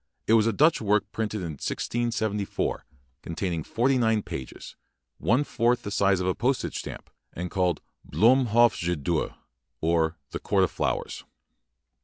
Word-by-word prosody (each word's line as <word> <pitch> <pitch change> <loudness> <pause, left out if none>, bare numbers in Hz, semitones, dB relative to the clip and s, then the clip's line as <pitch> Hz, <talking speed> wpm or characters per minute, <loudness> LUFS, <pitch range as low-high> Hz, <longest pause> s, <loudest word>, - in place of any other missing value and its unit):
It 110 - +3
was 115 -1 +5
a - - +3
Dutch 155 +4 +3
work 105 0 +2
printed 110 -2 -3
in 85 -3 -4
1674, 110 -4 -2 0.4
contain 85 +2 -3
ing 80 -2 -3
forty 130 - +1
nine 110 -3 +2
pages, 65 -2 -8 0.4
one 125 +6 +2
fourth 120 -3 +1
the 100 - -5
size 100 -2 +2
of 90 - -2
a 95 - +2
postage 125 +4 -1
stamp, - - -8 0.2
and 90 +1 -5
called 90 -4 0 0.3
"Bloem 125 +4 +4
Hof 120 +2 +4
je 90 +1 -1
door", 80 +2 -2 0.4
or 80 0 +1
"The - - -4
Court - - +2
of - - +1
Flowers". - - -2
105 Hz, 160 wpm, -26 LUFS, 90-120 Hz, 0.4 s, was